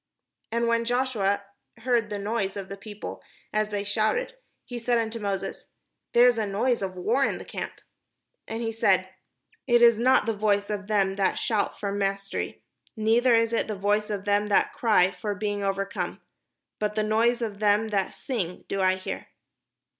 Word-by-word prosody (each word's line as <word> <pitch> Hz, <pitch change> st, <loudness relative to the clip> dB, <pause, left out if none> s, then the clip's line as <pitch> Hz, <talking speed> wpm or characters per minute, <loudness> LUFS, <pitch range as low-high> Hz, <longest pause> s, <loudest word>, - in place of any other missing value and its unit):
And 235 Hz, +1 st, +1 dB
when 230 Hz, 0 st, +2 dB
Joshua 235 Hz, -5 st, 0 dB, 0.3 s
heard 230 Hz, -2 st, +1 dB
the 205 Hz, -, -3 dB
noise 200 Hz, -1 st, -2 dB
of 195 Hz, -1 st, -6 dB
the 200 Hz, -, -5 dB
people 205 Hz, +1 st, -8 dB, 0.3 s
as 215 Hz, 0 st, +1 dB
they 205 Hz, -1 st, -2 dB
shouted, 215 Hz, -, 0 dB, 0.3 s
he 245 Hz, -1 st, -6 dB
said 240 Hz, +1 st, +1 dB
unto 230 Hz, 0 st, -1 dB
Moses: 195 Hz, -2 st, -3 dB, 0.5 s
"There 240 Hz, +1 st, +7 dB
is 245 Hz, -2 st, +4 dB
a 215 Hz, -, 0 dB
noise 230 Hz, +4 st, +1 dB
of 190 Hz, -1 st, -3 dB
war 230 Hz, +9 st, +1 dB
in -, -, 0 dB
the -, -, -9 dB
camp." -, -, -5 dB, 0.7 s
And 225 Hz, +1 st, -4 dB
he 225 Hz, -, -1 dB
said: 225 Hz, -, +2 dB, 0.3 s
" -, -, -38 dB
It 240 Hz, -1 st, +5 dB
is 235 Hz, -2 st, +6 dB
not 255 Hz, 0 st, +4 dB
the 225 Hz, -, 0 dB
voice 205 Hz, -1 st, +1 dB
of 200 Hz, -1 st, -4 dB
them 195 Hz, -2 st, +1 dB
that 195 Hz, -, +2 dB
shout 215 Hz, -3 st, 0 dB
for 200 Hz, -, -2 dB
mastery, 195 Hz, 0 st, -3 dB, 0.3 s
neither 230 Hz, +3 st, +4 dB
is 230 Hz, 0 st, +2 dB
it 230 Hz, -, +1 dB
the 215 Hz, -, -3 dB
voice 205 Hz, +2 st, +1 dB
of 205 Hz, -2 st, -3 dB
them 205 Hz, 0 st, +2 dB
that 205 Hz, -, +2 dB
cry 210 Hz, -8 st, +3 dB
for 200 Hz, +3 st, -4 dB
being 205 Hz, 0 st, -2 dB
overcome; 195 Hz, 0 st, -2 dB, 0.6 s
but 210 Hz, 0 st, -1 dB
the 215 Hz, -, +1 dB
noise 230 Hz, +3 st, +2 dB
of 205 Hz, -3 st, -4 dB
them 210 Hz, +1 st, +3 dB
that 200 Hz, -3 st, 0 dB
sing 190 Hz, -9 st, -4 dB
do 195 Hz, -, -2 dB
I 185 Hz, 0 st, +4 dB
hear." 185 Hz, -, -6 dB
210 Hz, 185 wpm, -26 LUFS, 200-230 Hz, 0.7 s, There